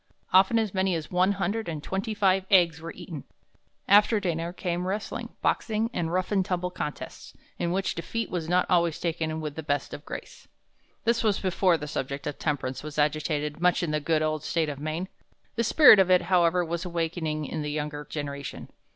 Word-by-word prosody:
Often 190 +5 +6
as 220 -4 0
many 190 -1 +1
as 160 -2 -5
one 185 +2 +3
hundred 200 +2 -2
and 155 -2 -5
twenty 195 +5 -3
five 190 -2 +2
eggs 170 -4 +4
were 165 - -6
eaten. 170 -5 -8 0.6
After 210 +2 +5
dinner 170 -3 -2
came 180 0 -3
wrestling, 205 +3 -3
boxing, 225 +1 0
and 165 -1 -2
rough 185 +2 -1
and 195 -2 +3
tumble 180 -1 -2
contests, 150 -5 -6 0.2
in 170 - 0
which 190 +1 0
defeat 220 +5 -4
was 165 -3 -3
not 180 0 +3
always 170 -3 +2
taken 160 -2 -2
with 150 -2 -4
the 160 - -5
best 145 -2 -2
of 145 - -7
grace. - - -9 0.6
"This 235 0 +1
was 210 -3 +2
before 185 -2 +2
the 150 - -6
subject 140 -1 -4
of 150 - -4
temperance 135 -4 -2
was 150 0 -8
agitated 150 0 0
much 180 0 +3
in 165 - -1
the 150 - +1
good 155 +1 +1
old 155 -1 -1
State 165 -2 0
of 140 -2 -5
Maine. 155 +5 -3 0.5
The 230 - +1
spirit 235 -2 +8
of 190 -1 +4
it, 180 -1 +5
however, 180 -1 +3
was 170 +1 -3
awakening 165 -3 -2
in 155 +2 -4
the 150 - -3
younger 150 0 -3
generation. 140 -2 -6
170 Hz, 195 wpm, -27 LUFS, 155-190 Hz, 0.6 s, spirit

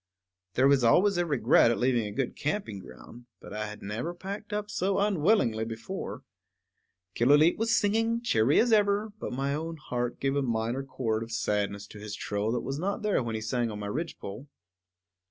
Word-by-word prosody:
There 130 +2 +5
is 135 -3 +4
always 190 - +4
a 175 -1 +1
regret 140 -5 +4
at 115 - +1
leaving 120 -3 +1
a - - -6
good 120 +4 -2
camping 150 - -3
ground, 95 - -13
but - - -11
I 105 0 -3
had 105 0 -9
never 115 - -4
packed 200 +4 -7
up 210 0 -3
so 190 +2 0
unwillingly 190 - +2
before. 115 - -6 0.9
Killooleet 145 +7 +5
was 225 0 +2
singing, 225 +3 +1
cheery 140 - +3
as 235 0 +3
ever; 205 0 +2
but - - -4
my 135 +2 -1
own 160 +2 -4
heart 125 -4 -3
gave 135 0 0
a 140 - +2
minor 115 0 -1
chord 115 -5 -2
of 115 0 -6
sadness 105 -2 -1
to 105 - -12
his 105 0 -6
trill 105 +1 -2
that 120 - -1
was 135 +3 -4
not 200 +4 -2
there 210 -7 +2
when 115 -2 -3
he 110 - -3
sang 120 +1 -1
on 105 - -5
my 105 - -5
ridgepole. 135 -3 -5
130 Hz, 190 wpm, -28 LUFS, -, 0.9 s, There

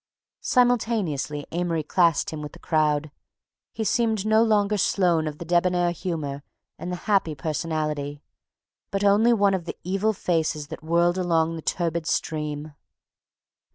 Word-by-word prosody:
Simultaneously 220 - +1
Amory 170 -2 -1
classed 170 0 +2
him 155 -1 -6
with 150 - -7
the - - -12
crowd, 150 -2 +1
and 155 - -13 0.6
he 225 - -4
seemed 220 -1 +1
no 220 +1 +4
longer 210 -2 +2
Sloane 175 -5 +2
of 150 -1 -5
the 170 - -7
debonair 175 +1 +2
humor 155 -6 -4 0.4
and 180 - -5
the - - -2
happy 195 -7 +2
personality, 150 -1 -3 0.7
but 195 0 -2
only 205 +4 +5
one 200 -4 +3
of 180 -3 -2
the - - -6
evil 195 +4 0
faces 160 -5 -1
that - - -7
whirled 170 +2 +2
along 165 -2 +1
the 160 - -6
turbid 170 -1 -1
stream. 150 -1 -2
170 Hz, 150 wpm, -25 LUFS, 155-200 Hz, 0.7 s, only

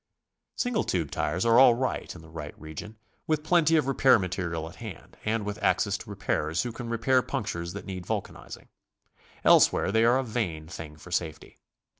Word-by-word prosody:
.Single 245 -4 0
tube 85 -5 -1
tires 75 +7 -1
are 115 +1 +6
all 125 -3 +8
right 130 -5 -3
in 85 - -12
the 80 - -14
right 75 -2 -8
region, 80 +8 -8 0.3
with 155 -1 0
plenty 165 -1 +4
of 155 - +3
repair 135 -2 +5
material 85 -4 -3
at 80 - -12
hand, - - -9
and 110 -1 0
with 105 0 -5
access - - +2
to - - -11
repairers 80 +2 -1
who 120 - -4
can 115 +1 -7
repair 130 +3 +2
punctures 85 -7 -4
that 100 - -7
need 95 -3 -6
vulcanizing. - - -5 0.7
Elsewhere - - +5
they 110 +2 +3
are 120 +2 +5
a 135 - 0
vain 100 -10 -3
thing 80 -2 -8
for 90 +4 -13
safety. 80 -3 -4
100 Hz, 185 wpm, -27 LUFS, 80-125 Hz, 0.7 s, all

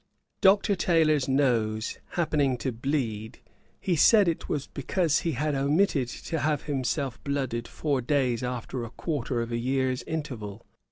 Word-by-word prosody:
Dr. 200 +1 +5
Taylor's 155 -6 +2
nose 115 -5 +1
happening 145 -6 +1
to 130 - -2
bleed, 115 -4 -2 0.4
he 180 - 0
said, 205 +5 +6
it 165 - -2
was 145 -2 -1
because 160 +3 0
he 165 -3 -1
had 150 +4 -1
omitted 140 0 +2
to 160 +6 -4
have 150 -1 0
himself 135 -2 -2
blooded 130 -5 -2
four 140 -4 -1
days 125 -2 +1
after 125 0 -4
a 115 - -6
quarter 125 -4 -2
of 115 - -7
a 115 - -1
year's 130 +1 0
interval. 115 -10 -5
135 Hz, 150 wpm, -27 LUFS, 120-155 Hz, 0.4 s, said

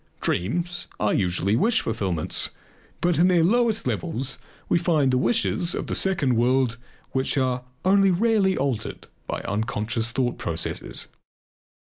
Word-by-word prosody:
Dreams 175 - -1
are 105 - +1
usually 95 +2 +1
wish 220 - +2
fulfillments, 95 -8 0 0.5
but 175 -3 +1
in 175 - +5
their 175 -3 +4
lowest 225 +3 +2
levels 135 -6 -2 0.3
we 170 - +2
find 160 -7 +2
the - - +3
wishes 185 - +1
of - - -3
the - - -4
second 150 -10 +1
world 125 -1 +2 0.3
which 130 +2 0
are 130 -1 0 0.2
only 195 +1 +5
rarely 195 0 +2
altered 130 -5 -3 0.2
by - - -3
unconscious 110 +2 -1
thought 120 0 -1
processes. 80 0 -2
135 Hz, 135 wpm, -24 LUFS, 115-180 Hz, 0.5 s, in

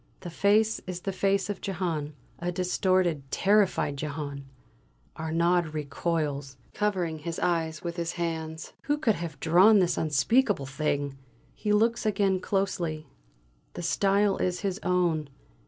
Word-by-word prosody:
The 175 - -7
face 210 +5 +2
is 180 -1 -5
the 195 - -2
face 195 +1 +1
of 205 -2 -4
Jehane 165 -6 -2 0.3
a 175 +1 -2
distorted, 180 -2 +1
terrified 195 -8 +2
Jehane! 145 -1 -5 0.7
Arnaud 170 +1 +1
recoils, 145 -2 -2 0.2
covering 180 -6 -1
his 165 +2 -5
eyes 160 -3 -1
with 170 0 -4
his 170 0 -2
hands. 160 -2 -4
Who 290 +1 +1
could 255 -8 +2
have 170 -5 -6
drawn 185 +7 +6
this 175 -3 +2
unspeakable 160 - +2
thing? 140 0 -2 0.3
He 210 - -2
looks 230 +3 +2
again 195 -2 +2
closely; 180 -6 -2 0.7
the - - -5
style 200 +3 +2
is 180 -1 -1
his 200 -1 -2
own! 175 -5 +1
175 Hz, 135 wpm, -28 LUFS, 155-195 Hz, 0.7 s, drawn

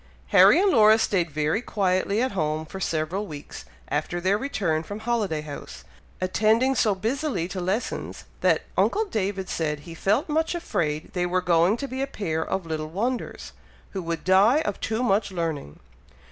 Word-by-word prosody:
Harry - - +7
and 395 0 +4
Laura 220 -2 +6
stayed 185 -6 +1
very 155 +7 0
quietly 200 0 0
at 260 - 0
home 155 -3 -1
for 190 +4 -8
several 175 +4 -2
weeks 145 -2 -9 0.2
after 175 - -2
their 185 +3 +2
return 200 - -1
from 205 +6 -7
Holiday 220 -9 -1
House, 150 -2 -9 0.4
attending 220 +7 +2
so 215 -6 +2
busily 230 - -1
to 185 0 -5
lessons, 190 +7 -3 0.2
that - - +2
uncle 435 +2 +2
David 195 - -2
said 150 -3 -2
he 165 +3 -10
felt 205 - +1
much 320 +2 0
afraid 155 - -2
they 175 -2 0
were 185 +1 +1
going 175 +3 +3
to 275 - -4
be 260 0 -4
a 275 - 0
pair 160 -11 -2
of 190 +1 -3
little 155 -1 -4
wonders, 235 +9 -3 0.4
who 190 - -4
would 165 -2 -4
die 200 +10 +5
of 205 -11 -3
too 220 +2 -1
much 200 -3 +1
learning. 160 - -3
190 Hz, 175 wpm, -25 LUFS, 165-225 Hz, 0.4 s, Harry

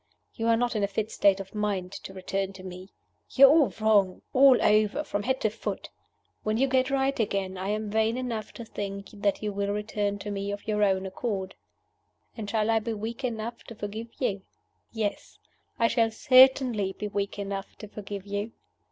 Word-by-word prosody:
You 225 -1 -2
are 230 0 +4
not 240 0 0
in 210 - 0
a 200 - +2
fit 210 +2 -3
state 195 -1 +3
of 195 -1 -8
mind 205 -4 -2
to 195 - -8
return 195 +1 -3
to 190 -1 -11
me. 185 +1 -9 0.4
You 275 - +7
are - - +8
all 305 -3 +4
wrong, 205 -4 +3
all 265 -1 +7
over, 215 +6 +3
from 205 -8 -3
head 260 +4 0
to 220 - +1
foot. 225 - -5 0.5
When 215 +1 0
you 270 +3 +3
get 260 0 +2
right 275 0 0
again, 195 -3 -1
I 190 +1 -4
am 215 0 -2
vain 220 +2 +1
enough 235 -4 -4
to 235 - -8
think 200 -2 -6
that 205 0 -1
you 210 -1 -2
will 200 0 -1
return 205 -1 -2
to 205 +1 -6
me 200 0 -3
of 205 +1 -7
your 210 -1 0
own 190 -2 +2
accord. 190 -1 -3 0.8
And 215 -3 -5
shall 220 0 +1
I 225 - +3
be 225 +1 -3
weak 225 +4 -5
enough 235 -1 -4
to 230 - -10
forgive 215 +2 -6
you? 205 -7 -1 0.5
Yes! 215 -3 -3 0.4
I 230 - +4
shall 230 -1 +2
certainly 255 -4 +5
be 210 - -5
weak 200 0 -3
enough 195 -1 -5
to 210 - -10
forgive 200 -1 -7
you. 205 +2 -4
210 Hz, 200 wpm, -27 LUFS, 200-230 Hz, 0.8 s, are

